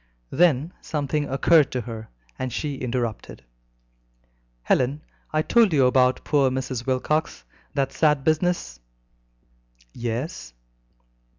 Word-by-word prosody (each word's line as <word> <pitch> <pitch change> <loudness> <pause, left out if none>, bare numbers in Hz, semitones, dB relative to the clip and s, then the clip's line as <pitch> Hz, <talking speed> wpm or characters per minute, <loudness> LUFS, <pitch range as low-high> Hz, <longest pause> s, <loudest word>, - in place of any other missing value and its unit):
Then 165 -1 +2
something 150 -1 -2
occurred 145 +3 +4
to 125 - -1
her, 110 -1 -8 0.3
and 130 -1 -3
she 145 +4 -3
interrupted: 120 - -4 1.2
"Helen, 135 - +1 0.3
I 155 0 +1
told 225 -3 +4
you 135 -4 +4
about 125 0 +3
poor 140 -3 +2
Mrs. 130 -1 -4
Wilcox; 135 - -1 0.3
that 135 -1 0
sad 150 -3 +2
business?" 160 - 0 1.1
"Yes." 115 - -4
135 Hz, 105 wpm, -24 LUFS, 125-155 Hz, 1.2 s, occurred